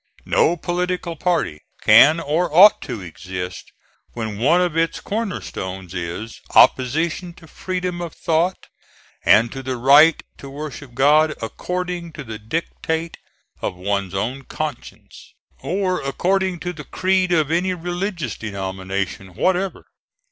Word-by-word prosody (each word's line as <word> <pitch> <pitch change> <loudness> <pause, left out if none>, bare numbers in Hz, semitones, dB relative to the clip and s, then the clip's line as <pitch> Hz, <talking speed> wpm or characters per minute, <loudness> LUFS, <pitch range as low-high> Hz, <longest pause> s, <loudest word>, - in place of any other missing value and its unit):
No 175 - +3
political 175 0 -2
party 165 - 0 0.2
can 140 +10 +7
or 165 +3 0
ought 190 +7 +7
to 120 -5 -6
exist 90 +1 -7 0.4
when 110 -3 -4
one 155 +9 +4
of 175 -3 0
its 165 0 0
corner 215 -2 -3
stones 95 -1 -6
is 90 +5 -5
opposition 160 +7 +3
to 170 - -15
freedom 180 +1 -4
of 170 -3 -6
thought 170 +2 0 0.6
and 110 +3 +5
to 135 - -6
the 130 -1 -3
right 145 +6 +6 0.2
to 140 - -9
worship 145 -2 -8
God 150 +4 +4
"according 175 +7 -4
to 150 - -7
the 110 -4 -7
dictate 160 +6 -3 0.4
of - - -3
one's 95 0 -2
own 125 +8 -2
conscience," - - -7 0.2
or 185 0 -1
according 185 +6 0
to 180 0 -3
the - - -9
creed 185 -1 +1
of 155 -3 +2
any 180 +2 +1
religious 175 - -3
denomination 95 -2 -4
whatever. 185 - 0
155 Hz, 135 wpm, -21 LUFS, 110-180 Hz, 0.6 s, can